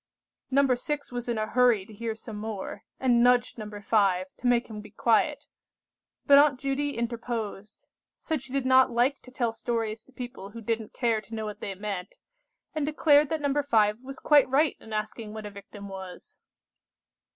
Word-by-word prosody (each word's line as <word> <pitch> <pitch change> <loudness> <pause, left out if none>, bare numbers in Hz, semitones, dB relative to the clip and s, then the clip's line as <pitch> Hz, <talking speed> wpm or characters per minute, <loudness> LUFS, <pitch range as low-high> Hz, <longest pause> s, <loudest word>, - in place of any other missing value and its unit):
No. 275 +1 +4
6 285 +3 -3
was 245 0 -4
in 235 - 0
a 215 - 0
hurry 240 -4 +3
to 215 - -14
hear 225 +1 -4
some 220 -1 -8
more, 210 -2 -5 0.2
and 245 -2 +3
nudged 245 -1 +3
No. 215 -1 -6
5 200 -3 +1
to 250 - -2
make 245 0 +3
him 215 -2 -8
be 210 - -12
quiet; 230 +2 +1 0.8
but 280 0 +8
Aunt 285 -3 +4
Judy 280 0 -2
interposed; 230 -3 -4 0.3
said 315 -5 -3
she 265 -1 -12
did 275 -1 -1
not 260 0 +6
like 250 +4 +1
to - - -14
tell 240 -3 -1
stories 225 -1 -3
to - - -21
people 245 -6 -8
who 230 +3 -9
didn't 225 -1 -3
care 230 -3 +1
to 225 +2 -9
know 220 -1 -3
what 210 -1 -6
they 195 - -5
meant, 195 -2 -5 0.6
and 310 -1 -1
declared 295 -1 +4
that 320 -2 -1
No. 285 0 +1
5 215 -6 +2
was 270 +1 -8
quite 290 -3 +4
right 285 +2 +3
in 220 - -13
asking 215 0 -4
what 215 -1 -6
a 205 - -6
victim 200 0 -10
was. 190 -2 -10
235 Hz, 190 wpm, -27 LUFS, 210-265 Hz, 0.8 s, but